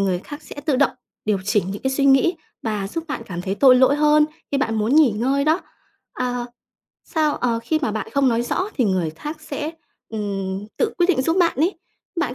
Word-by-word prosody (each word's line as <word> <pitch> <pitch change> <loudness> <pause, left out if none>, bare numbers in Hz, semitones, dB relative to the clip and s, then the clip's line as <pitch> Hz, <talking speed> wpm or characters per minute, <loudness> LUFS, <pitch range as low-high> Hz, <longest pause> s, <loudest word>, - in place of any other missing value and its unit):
người 190 -2 +1
khác 290 +9 -9
sẽ - - -11
tự 290 -3 0
động 285 - +3 0.3
điều 210 -2 +1
chỉnh 205 -2 +1
những 200 - -6
cái 265 - 0
suy 275 +1 0
nghĩ 275 +6 +5 0.3
và 210 -3 -2
giúp 330 +9 -4
bạn 285 - -3
cảm 175 -2 -5
thấy 195 +1 -2
tội 255 +2 +6
lỗi 260 +3 +5
hơn 300 0 +5 0.3
khi 280 - +1
bạn 225 -4 0
muốn 220 +4 +1
nghỉ 305 -6 +6
ngơi 265 +7 0
đó. 315 +4 +3 0.5
Ờ, 245 -1 -2 0.6
sao, 310 -3 0
ờ, 235 -2 0
khi 310 +7 0
mà 220 -8 0
bạn 220 -2 -3
không 280 -1 +4
nói 235 -1 +1
rõ 370 +10 -1
thì 255 - +2
người 185 -6 +1
khác 300 - -7
sẽ, 300 0 -4 0.4
ừm, 200 -2 -3
tự 460 - 0
quyết 350 - +4
định 315 -8 +3
giúp 325 +5 +1
bạn 335 -5 +3
ấy. 335 +8 +1 0.4
Bạn 250 -7 -1
255 Hz, 225 wpm, -22 LUFS, 210-300 Hz, 0.6 s, tội